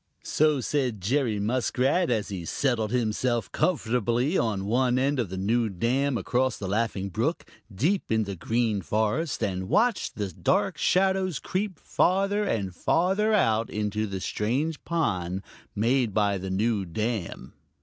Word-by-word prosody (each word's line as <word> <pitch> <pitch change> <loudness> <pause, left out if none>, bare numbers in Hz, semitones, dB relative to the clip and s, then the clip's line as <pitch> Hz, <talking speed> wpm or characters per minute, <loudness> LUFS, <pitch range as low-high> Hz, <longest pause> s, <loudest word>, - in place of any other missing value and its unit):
So 150 -3 +2
said 125 -4 -1
Jerry 115 +2 0
Muskrat, 130 - +1
as 110 -4 0
he 95 -4 -5
settled 115 - 0
himself 120 0 0
comfortably 125 - +1
on 105 - 0
one 125 +3 +2
end 135 +1 +1
of 115 -7 -1
the 95 - -5
new 110 +4 +1
dam 125 +8 0
across 125 +1 0
the 100 - -5
Laughing 100 -1 -1
Brook 120 - -1 0.3
deep 155 - 0
in 110 0 +2
the 100 -1 -5
Green 110 +2 0
Forest 110 - -1
and 95 -1 -2
watched 235 0 +1
the 100 -2 -3
dark - - 0
shadows 190 -3 +2
creep 185 - -3
farther 195 +3 +1
and 100 - -1
farther 190 - +1
out 115 - +2
into 105 0 -2
the 95 -1 -4
strange 130 - -2
pond 95 - -1 0.3
made 115 0 +1
by 100 -2 +2
the 95 +1 -5
new 105 +2 +1
dam. 95 - -4
115 Hz, 150 wpm, -26 LUFS, 105-145 Hz, 0.3 s, So